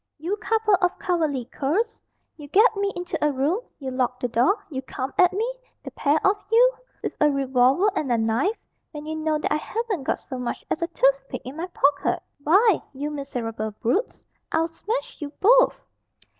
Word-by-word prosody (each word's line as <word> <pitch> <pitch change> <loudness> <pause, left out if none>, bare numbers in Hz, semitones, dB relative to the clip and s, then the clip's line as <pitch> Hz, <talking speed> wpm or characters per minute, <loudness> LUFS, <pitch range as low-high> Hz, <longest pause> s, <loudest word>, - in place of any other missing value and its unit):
"You 340 +7 -2
couple 435 0 +1
of 360 -1 +1
cowardly 315 -8 -1
curs! 330 - -1 0.3
You 295 -2 -11
get 430 - +5
me 400 0 0
into 355 -3 -3
a 300 - +3
room, 285 +9 0 0.2
you 265 -2 -5
lock 250 -1 -1
the 245 - -1
door, 245 - +3
you 265 -2 -3
come 260 +1 -5
at 360 -1 +5
me, 415 +4 -1 0.4
the - - -7
pair 290 +1 +2
of 390 +2 +4
you, - - +6 0.3
with - - -2
a 300 - +6
revolver 270 +5 +3
and 270 -5 -1
a 235 - +3
knife, 230 - +1 0.4
when 300 0 -7
you 315 0 -4
know 310 -1 0
that 300 - -1
I - - +2
haven't 430 +1 -3
got - - 0
so 260 -2 -7
much 245 -1 -4
as - - -1
a 335 - +1
toothpick 275 -4 0
in 260 +3 -7
my 335 +3 -4
pocket! 290 -5 +1 0.2
Why, 380 +7 +4
you 290 +3 -3
miserable 235 -6 -4
brutes, 255 - -1 0.3
I'll 325 +1 +1
smash 470 +9 -4
you 295 - -4
both!" - - +4
305 Hz, 190 wpm, -24 LUFS, 270-395 Hz, 0.4 s, you